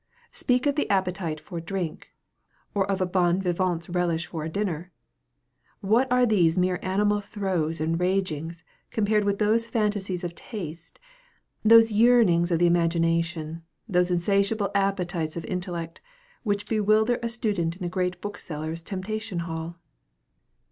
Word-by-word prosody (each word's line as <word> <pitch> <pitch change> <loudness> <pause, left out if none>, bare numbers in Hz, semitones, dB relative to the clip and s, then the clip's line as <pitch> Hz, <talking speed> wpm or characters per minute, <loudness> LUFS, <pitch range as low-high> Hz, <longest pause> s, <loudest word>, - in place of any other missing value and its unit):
Speak 250 +1 +1
of 285 - +3
the 295 - -1
appetite 180 -5 0
for 170 +3 -7
drink; 170 -1 -4 0.6
or 195 -1 0
of 195 -1 0
a - - +3
bon 180 0 +2
vivant's 175 -2 -1
relish 175 -2 0
for 160 -2 -5
a 160 - -3
dinner! 180 -2 -3 0.9
What 230 +6 +2
are 250 0 +5
these 180 -7 +3
mere 180 0 +1
animal 205 +2 +1
throes 185 -6 -2
and 165 +2 0
ragings 175 -3 -1 0.3
compared 210 -1 +1
with 200 0 +1
those 220 +2 +2
fantasies 205 -5 -1
of 175 -1 -3
taste, 170 -5 -8 0.7
those 225 +1 +7
yearnings 210 -6 +4
of 170 - +2
the 175 - +3
imagination, 165 -1 +1 0.3
those 180 -3 +2
insatiable 200 +4 +1
appetites 180 -5 0
of 165 - -5
intellect, 175 -3 -4 0.4
which 205 -2 -1
bewilder 220 +2 +2
a 235 - -1
student 205 -8 -1
in 185 - -8
a - - 0
great 180 +1 -2
bookseller's 165 -5 -5
temptation 205 +2 -4
hall? 165 0 -5
185 Hz, 140 wpm, -26 LUFS, 170-205 Hz, 0.9 s, those